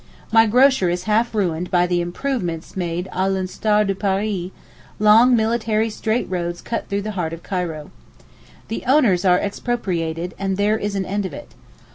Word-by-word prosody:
My 225 0 +6
grocer 250 -4 +4
is 175 +1 -2
half 220 +2 +1
ruined 180 -4 -1
by 180 -2 +3
the 175 -1 0
'improvements' 175 -3 -3
made 175 0 -3
a 190 +1 0
l'instar 200 +3 +1
de 195 - 0
Paris—long 210 +4 +1
military 220 -1 0
straight 220 +3 -1
roads 175 -1 -3
cut 230 - -4
through 200 0 -1
the 215 - -3
heart 175 -5 -3
of 165 - -9
Cairo. 170 -6 -4 0.8
The 225 - -4
owners 235 -10 +3
are 180 -1 +5
expropriated, 180 -6 -2
and 195 -1 -1
there 210 +2 +1
is 205 0 -3
an 195 -1 -1
end 200 +1 -2
of - - -11
it. 295 - -11
195 Hz, 165 wpm, -21 LUFS, 180-220 Hz, 0.8 s, My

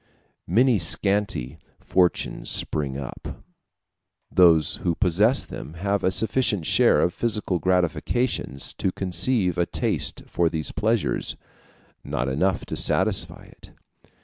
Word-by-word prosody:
Many 115 +4 +3
scanty 100 - -1 0.2
fortunes 90 -2 0
spring 70 -3 0
up; 70 -3 -8 0.9
those 85 -4 +4
who 85 -2 -1
possess 105 +8 +2
them 80 - -9
have 100 +3 -1
a - - +3
sufficient 105 -2 +1
share - - +4
of 90 - +1
physical 105 -6 -1
gratifications 90 - -1
to 95 - 0
conceive 90 0 0
a 85 - +1
taste - - -1
for 85 -1 0
these 80 -1 -3
pleasures 110 -1 -1 0.7
not 65 +1 -3
enough 85 +9 0
to - - -5
satisfy - - +1
it. - - -16
90 Hz, 120 wpm, -24 LUFS, 80-105 Hz, 0.9 s, those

